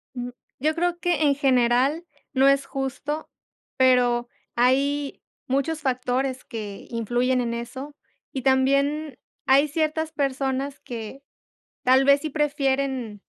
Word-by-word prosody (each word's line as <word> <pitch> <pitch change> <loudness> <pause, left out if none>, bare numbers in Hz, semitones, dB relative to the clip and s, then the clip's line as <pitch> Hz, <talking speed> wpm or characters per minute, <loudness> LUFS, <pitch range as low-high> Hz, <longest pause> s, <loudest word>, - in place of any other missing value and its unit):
Mm, 245 0 -4 0.3
yo 310 +4 +1
creo 345 0 0
que 345 -3 +1
en 285 -1 +4
general 265 +3 +2 0.3
no 270 +1 +4
es 275 0 +4
justo, 275 +3 -4 0.5
pero 245 -2 +3 0.3
hay 275 +4 +1 0.3
muchos 280 +4 0
factores 255 0 -1
que 215 -5 -7
influyen 245 +2 0
en 235 -1 -2
eso, 260 +5 -6 0.4
y 265 - -4
también 275 +2 +2 0.3
hay 275 +3 +5
ciertas 315 +1 -1
personas 275 -1 -2
que, 235 +3 -7 0.6
tal 260 +1 +5
vez 280 0 +5
sí 310 - -3
prefieren 275 -7 -1
270 Hz, 120 wpm, -24 LUFS, 250-285 Hz, 0.6 s, hay